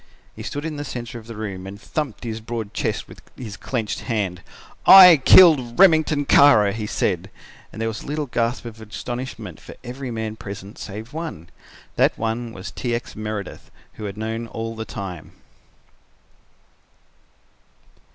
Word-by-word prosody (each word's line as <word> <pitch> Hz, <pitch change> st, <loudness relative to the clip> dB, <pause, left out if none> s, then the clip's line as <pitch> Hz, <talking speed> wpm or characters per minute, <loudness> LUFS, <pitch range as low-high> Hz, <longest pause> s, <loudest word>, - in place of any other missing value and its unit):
He -, -, -9 dB
stood 145 Hz, +2 st, -5 dB
in 155 Hz, -2 st, -4 dB
the 145 Hz, -, -4 dB
centre 120 Hz, -2 st, -6 dB
of 110 Hz, -, -16 dB
the 115 Hz, -, -8 dB
room 100 Hz, -3 st, -6 dB
and 100 Hz, +1 st, -9 dB
thumped 140 Hz, -1 st, -4 dB
his 115 Hz, -1 st, -5 dB
broad 115 Hz, -2 st, -5 dB
chest -, -, -2 dB
with -, -, -14 dB, 0.2 s
his 110 Hz, -6 st, -7 dB
clenched 115 Hz, 0 st, -3 dB
hand. 100 Hz, -6 st, -2 dB, 0.5 s
"I 180 Hz, -4 st, +11 dB
killed 135 Hz, -4 st, +6 dB
Remington 160 Hz, -5 st, +5 dB
Kara," 110 Hz, -9 st, +6 dB
he 110 Hz, 0 st, -4 dB
said, 95 Hz, -2 st, -1 dB, 0.4 s
and -, -, -10 dB
there 115 Hz, -, -1 dB
was 110 Hz, -1 st, -4 dB
a -, -, -11 dB
little 150 Hz, +1 st, -2 dB
gasp 120 Hz, -1 st, -1 dB
of 115 Hz, -1 st, -9 dB
astonishment 110 Hz, -2 st, -6 dB
from -, -, -12 dB
every 130 Hz, +1 st, -6 dB
man 110 Hz, -2 st, -4 dB
present 100 Hz, 0 st, -9 dB
save 110 Hz, +6 st, -8 dB
one. 155 Hz, -, -6 dB, 0.5 s
That -, -, +3 dB
one 115 Hz, +1 st, -3 dB
was 95 Hz, -4 st, -8 dB
T. 120 Hz, -2 st, -2 dB
X. 120 Hz, -, -6 dB
Meredith, 105 Hz, -2 st, -6 dB, 0.2 s
who 110 Hz, -, -8 dB
had 100 Hz, 0 st, -6 dB
known 110 Hz, +1 st, -4 dB
all 115 Hz, 0 st, -5 dB
the 110 Hz, 0 st, -5 dB
time. 95 Hz, -7 st, -7 dB
115 Hz, 160 wpm, -22 LUFS, 105-130 Hz, 0.5 s, I